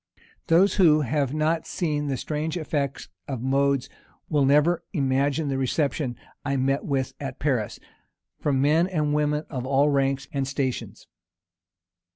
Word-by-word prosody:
Those 180 Hz, +5 st, +4 dB
who 155 Hz, -5 st, +5 dB
have 140 Hz, 0 st, 0 dB
not 155 Hz, +2 st, 0 dB
seen 150 Hz, -4 st, -1 dB
the 135 Hz, -2 st, -1 dB
strange 155 Hz, +5 st, -3 dB
effects 145 Hz, -4 st, -2 dB, 0.2 s
of 130 Hz, -3 st, -4 dB
modes, 140 Hz, 0 st, +1 dB, 0.4 s
will 145 Hz, -3 st, +3 dB
never 150 Hz, +5 st, +3 dB
imagine 140 Hz, 0 st, +1 dB
the 135 Hz, -1 st, -1 dB
reception 135 Hz, -1 st, -1 dB, 0.3 s
I 140 Hz, -1 st, -1 dB
met 135 Hz, +2 st, +1 dB
with 135 Hz, -2 st, -1 dB
at 135 Hz, -2 st, -5 dB
Paris, 125 Hz, -8 st, -1 dB, 0.6 s
from 135 Hz, -2 st, +1 dB
men 160 Hz, +5 st, +3 dB
and 155 Hz, -5 st, 0 dB
women 150 Hz, 0 st, 0 dB
of 130 Hz, -4 st, -3 dB
all 140 Hz, +2 st, +3 dB
ranks 135 Hz, -1 st, 0 dB
and 135 Hz, -2 st, -1 dB
stations. 135 Hz, -2 st, -3 dB
140 Hz, 145 wpm, -25 LUFS, 135-150 Hz, 0.6 s, who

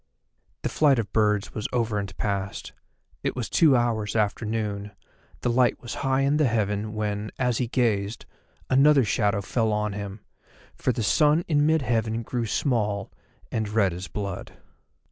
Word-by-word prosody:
The -, -, 0 dB
flight 145 Hz, -4 st, +3 dB
of 105 Hz, -5 st, -3 dB
birds 105 Hz, -2 st, +1 dB
was 105 Hz, -, -3 dB
over 115 Hz, -4 st, 0 dB
and 100 Hz, -2 st, -6 dB
past; 100 Hz, -1 st, -3 dB, 0.5 s
it -, -, -2 dB
was 120 Hz, -4 st, -3 dB
two 150 Hz, +1 st, +5 dB
hours 115 Hz, -3 st, 0 dB
after 105 Hz, +1 st, 0 dB
noon, 105 Hz, -2 st, -3 dB, 0.5 s
the 125 Hz, -, 0 dB
light 125 Hz, 0 st, +3 dB
was 120 Hz, -4 st, -7 dB
high 135 Hz, -1 st, +1 dB
in 140 Hz, +2 st, +2 dB
the 150 Hz, -3 st, +3 dB
heaven, 105 Hz, -1 st, -1 dB
when, 105 Hz, 0 st, -2 dB
as 125 Hz, -3 st, 0 dB
he 125 Hz, -, 0 dB
gazed, 110 Hz, -4 st, 0 dB, 0.4 s
another 140 Hz, +1 st, +5 dB
shadow 100 Hz, -1 st, +1 dB
fell 110 Hz, +3 st, 0 dB
on 105 Hz, -1 st, -1 dB
him, 100 Hz, 0 st, -6 dB, 0.5 s
for -, -, 0 dB
the 115 Hz, -1 st, -2 dB
sun 150 Hz, +7 st, +3 dB
in 145 Hz, -2 st, +3 dB
mid 160 Hz, -2 st, +3 dB
heaven 115 Hz, -1 st, 0 dB
grew 120 Hz, 0 st, -2 dB
small, 105 Hz, -6 st, 0 dB, 0.4 s
and 110 Hz, -2 st, -1 dB
red 100 Hz, -4 st, +2 dB
as 90 Hz, +2 st, -6 dB
blood. 100 Hz, -1 st, -5 dB
110 Hz, 165 wpm, -25 LUFS, 105-125 Hz, 0.5 s, two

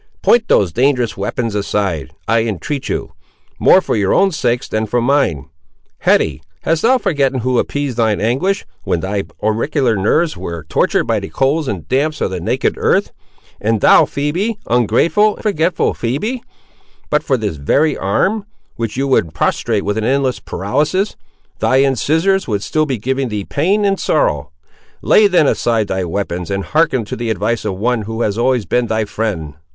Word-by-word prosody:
Point 235 Hz, -2 st, +4 dB
those 90 Hz, -5 st, +2 dB
dangerous 125 Hz, -3 st, +1 dB
weapons 115 Hz, -3 st, -3 dB
aside, 100 Hz, -8 st, -1 dB, 0.2 s
I 115 Hz, +1 st, +3 dB
entreat 115 Hz, -, -3 dB
of -, -, -5 dB
you; -, -, -3 dB, 0.5 s
more -, -, +6 dB
for -, -, -2 dB
your 100 Hz, -2 st, +1 dB
own 195 Hz, 0 st, +4 dB
sakes, 125 Hz, -7 st, -1 dB
than 110 Hz, 0 st, -2 dB
for 120 Hz, +3 st, 0 dB
mine. 120 Hz, -, +1 dB, 0.5 s
Hetty, -, -, +2 dB, 0.2 s
hast 160 Hz, +1 st, 0 dB
thou 255 Hz, +3 st, +4 dB
forgotten 140 Hz, -, 0 dB
who 125 Hz, +1 st, +1 dB
appeased 145 Hz, -4 st, -2 dB
thine 110 Hz, -3 st, +1 dB
anguish 135 Hz, -, 0 dB, 0.2 s
when 85 Hz, -, -1 dB
thy 100 Hz, +2 st, -2 dB, 0.2 s
auricular 115 Hz, +3 st, +1 dB
nerves 155 Hz, -, +1 dB
were 85 Hz, -3 st, -6 dB
tortured 80 Hz, -, +1 dB
by -, -, 0 dB
the -, -, -7 dB
colds 140 Hz, +3 st, 0 dB
and 95 Hz, -8 st, -4 dB
damps 150 Hz, +4 st, 0 dB
of -, -, -1 dB
the 95 Hz, -, -3 dB
naked -, -, -1 dB
earth! -, -, +1 dB, 0.5 s
and 110 Hz, 0 st, +1 dB
thou, -, -, +6 dB
Phoebe, 175 Hz, +10 st, -2 dB
ungrateful 125 Hz, -, +2 dB
and -, -, -13 dB
forgetful 180 Hz, -5 st, +1 dB
Phoebe! 210 Hz, -, -2 dB, 0.7 s
but 150 Hz, -, +3 dB
for 135 Hz, -3 st, 0 dB
this 105 Hz, -8 st, -3 dB
very 140 Hz, -, +1 dB
arm, 195 Hz, -, 0 dB, 0.3 s
which 115 Hz, 0 st, -3 dB
you 135 Hz, +1 st, 0 dB
would 85 Hz, -, +1 dB
prostrate -, -, 0 dB
with 105 Hz, +2 st, -1 dB
an -, -, -2 dB
endless 130 Hz, +1 st, +1 dB
paralysis, 150 Hz, -, -1 dB, 0.4 s
thy 130 Hz, +1 st, +3 dB
incisores 160 Hz, -, +1 dB
would 105 Hz, -3 st, -1 dB
still 155 Hz, +5 st, 0 dB
be 130 Hz, -3 st, -1 dB
giving 130 Hz, +4 st, -2 dB
thee 105 Hz, -2 st, -3 dB
pain 195 Hz, +8 st, +1 dB
and 195 Hz, -1 st, +1 dB
sorrow! 75 Hz, -, 0 dB, 0.5 s
Lay, 210 Hz, -, +5 dB
then, 180 Hz, -5 st, +3 dB
aside 115 Hz, -5 st, +1 dB
thy 95 Hz, 0 st, -1 dB
weapons, 90 Hz, -1 st, -3 dB
and 100 Hz, 0 st, -2 dB
hearken 155 Hz, -7 st, +1 dB
to -, -, -5 dB
the 120 Hz, 0 st, -3 dB
advice 110 Hz, +1 st, -1 dB
of 95 Hz, -3 st, -2 dB
one 120 Hz, +3 st, 0 dB
who 110 Hz, +2 st, -3 dB
has 100 Hz, -, 0 dB
always 120 Hz, -1 st, +1 dB
been 125 Hz, -1 st, 0 dB
thy 110 Hz, -1 st, 0 dB
friend. 100 Hz, -8 st, -3 dB
120 Hz, 180 wpm, -17 LUFS, 105-150 Hz, 0.7 s, more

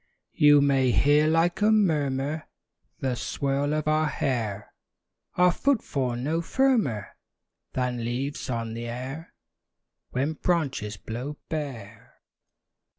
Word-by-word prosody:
You 145 Hz, -1 st, +6 dB
may 135 Hz, -2 st, +3 dB
hear, 145 Hz, +4 st, +4 dB
like 165 Hz, +4 st, +2 dB
a 210 Hz, -, +5 dB
murmur, 155 Hz, -7 st, +1 dB, 0.5 s
The 130 Hz, -1 st, 0 dB
swirl 140 Hz, +3 st, -1 dB
of 155 Hz, 0 st, -2 dB
our 155 Hz, 0 st, +2 dB
hair; 110 Hz, -8 st, -2 dB, 0.6 s
Our 180 Hz, 0 st, +5 dB
footfall; 150 Hz, -, 0 dB
no 150 Hz, +7 st, -1 dB
firmer 215 Hz, -, +1 dB, 0.6 s
Than 125 Hz, -2 st, -1 dB
leaves 130 Hz, +5 st, -3 dB
on 115 Hz, -2 st, -3 dB
the 115 Hz, +1 st, -5 dB
air 130 Hz, +7 st, -6 dB, 0.7 s
When 140 Hz, +5 st, -1 dB
branches 140 Hz, -, -1 dB
blow 125 Hz, +9 st, -6 dB
bare. 140 Hz, -, -6 dB
140 Hz, 110 wpm, -26 LUFS, 125-155 Hz, 0.7 s, You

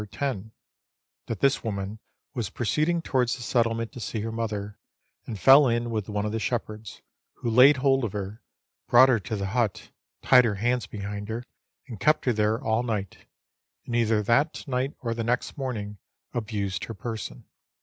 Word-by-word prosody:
10; 110 Hz, -2 st, -3 dB, 0.8 s
that 110 Hz, -, -4 dB
this 140 Hz, 0 st, +3 dB
woman 100 Hz, -1 st, -4 dB, 0.3 s
was 120 Hz, -8 st, -3 dB
proceeding 155 Hz, +8 st, 0 dB
towards 125 Hz, -5 st, +1 dB
the 120 Hz, -, -8 dB
settlement 115 Hz, -1 st, 0 dB
to -, -, -9 dB
see 110 Hz, 0 st, -3 dB
her 110 Hz, +1 st, -3 dB
mother, 105 Hz, -3 st, -4 dB, 0.5 s
and 110 Hz, -4 st, -5 dB
fell 135 Hz, +4 st, +8 dB
in 120 Hz, 0 st, 0 dB
with 110 Hz, -2 st, -3 dB
one 105 Hz, 0 st, -1 dB
of 105 Hz, -, -2 dB
the 115 Hz, -, -2 dB
shepherds, 110 Hz, -3 st, -4 dB, 0.3 s
who 120 Hz, -, -3 dB
laid 130 Hz, +5 st, +7 dB
hold 135 Hz, 0 st, +2 dB
of 110 Hz, -, -1 dB
her, 100 Hz, +2 st, -5 dB, 0.5 s
brought 130 Hz, +2 st, +7 dB
her 120 Hz, -3 st, +3 dB
to 100 Hz, +3 st, -4 dB
the 100 Hz, -1 st, -2 dB
hut, 115 Hz, -4 st, -1 dB, 0.3 s
tied 125 Hz, -1 st, +7 dB
her 110 Hz, -4 st, 0 dB
hands 120 Hz, +4 st, 0 dB
behind 105 Hz, 0 st, -6 dB
her, 115 Hz, +2 st, -3 dB, 0.4 s
and 115 Hz, -6 st, -8 dB
kept 155 Hz, +9 st, +3 dB
her 125 Hz, -, +3 dB
there 110 Hz, +1 st, +1 dB
all 110 Hz, -1 st, +1 dB
night, 105 Hz, -6 st, -4 dB, 0.6 s
and 120 Hz, -, -3 dB
either 110 Hz, -2 st, +2 dB
that 140 Hz, +9 st, +1 dB
night 130 Hz, +1 st, -1 dB
or 115 Hz, -1 st, -1 dB
the 115 Hz, 0 st, -3 dB
next 120 Hz, +2 st, -1 dB
morning 105 Hz, -7 st, -4 dB, 0.3 s
abused 100 Hz, -5 st, -3 dB
her 115 Hz, -, -7 dB
person. 110 Hz, +2 st, -6 dB
115 Hz, 180 wpm, -26 LUFS, 105-125 Hz, 0.8 s, fell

